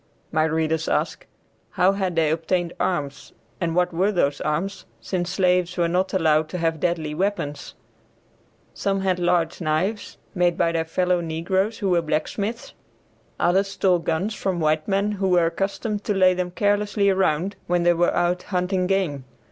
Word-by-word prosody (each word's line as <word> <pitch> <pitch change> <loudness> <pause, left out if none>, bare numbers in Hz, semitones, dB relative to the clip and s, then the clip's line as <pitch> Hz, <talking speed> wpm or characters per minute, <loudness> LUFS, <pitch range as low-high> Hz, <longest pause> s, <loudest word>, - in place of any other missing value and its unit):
My 155 0 +2
readers 160 0 0
ask, - - -1 0.4
how 185 +2 +3
had 190 -3 -2
they 160 -2 +2
obtained 170 +2 -1
arms 145 -6 -2 0.3
and 165 -1 -1
what 180 -1 +1
were 190 +5 +2
those 145 -7 0
arms, 165 +6 -2
since 175 +10 -3
slaves 180 -1 +1
were 170 -1 +2
not 180 +3 0
allowed 155 -4 +2
to 180 - -4
have 165 -2 -1
deadly 165 -3 -1
weapons? 170 -4 -3 1.0
Some 195 -1 -1
had 185 -2 0
large 175 -1 +1
knives 170 +7 -1 0.2
made 175 -3 +1
by 165 - +2
their 165 -1 -1
fellow 180 +1 +1
negroes 185 +6 -1
who 195 -4 -1
were 175 -1 +3
blacksmiths, 200 +8 -3 0.7
others 190 +3 +2
stole 190 -2 +1
guns 170 +6 -1
from 190 -4 -2
white 155 -1 +1
men 200 +1 +1
who 195 -2 -1
were 175 -2 +4
accustomed 200 +5 -2
to 210 - 0
lay 185 -1 +5
them 180 0 -2
carelessly 205 +2 +1
around 190 0 +1
when 175 0 +1
they 175 0 +5
were 175 +1 +2
out 175 +1 +1
hunting 180 -1 -1
game. 180 -8 0
180 Hz, 165 wpm, -23 LUFS, 165-195 Hz, 1.0 s, lay